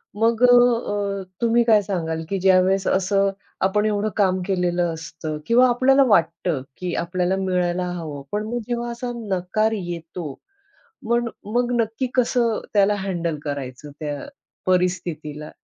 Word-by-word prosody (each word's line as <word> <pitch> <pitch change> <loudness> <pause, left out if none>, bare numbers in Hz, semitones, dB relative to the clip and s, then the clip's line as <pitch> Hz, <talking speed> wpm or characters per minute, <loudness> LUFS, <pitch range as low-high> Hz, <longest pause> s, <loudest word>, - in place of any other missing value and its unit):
मग 230 +2 +2
अ, 230 -5 +3 0.2
तुम्ही 235 0 +4
काय 220 -3 +5
सांगाल 165 -5 -3
की 195 - -1
ज्यावेळेस 190 +1 +3
असं 195 +1 +2 0.4
आपण 210 +2 +1
एवढं 210 0 0
काम 185 -2 +2
केलेलं 175 -3 0
असतं 160 -1 -6
किंवा 250 +5 +5
आपल्याला 270 +3 +4
वाटतं, 170 - +2 0.2
की 180 -1 -3
आपल्याला 180 +2 0
मिळायला 180 -1 0
हवं 150 -4 -6
पण 210 +1 -1
मग 240 +2 -2
जेव्हा 240 0 -2
असा 245 +1 -4
नकार 215 0 0
येतो 170 -4 -5 0.8
मन 235 0 +2 0.3
मग 245 0 +2
नक्की 225 +4 -1
कसं 240 -2 +2
त्याला 205 0 +4
हँडल 170 -5 -2
करायचं 140 -1 -5
त्या 145 -2 -3 0.5
परिस्थितीला? 175 -5 -1
190 Hz, 135 wpm, -22 LUFS, 175-225 Hz, 0.8 s, काय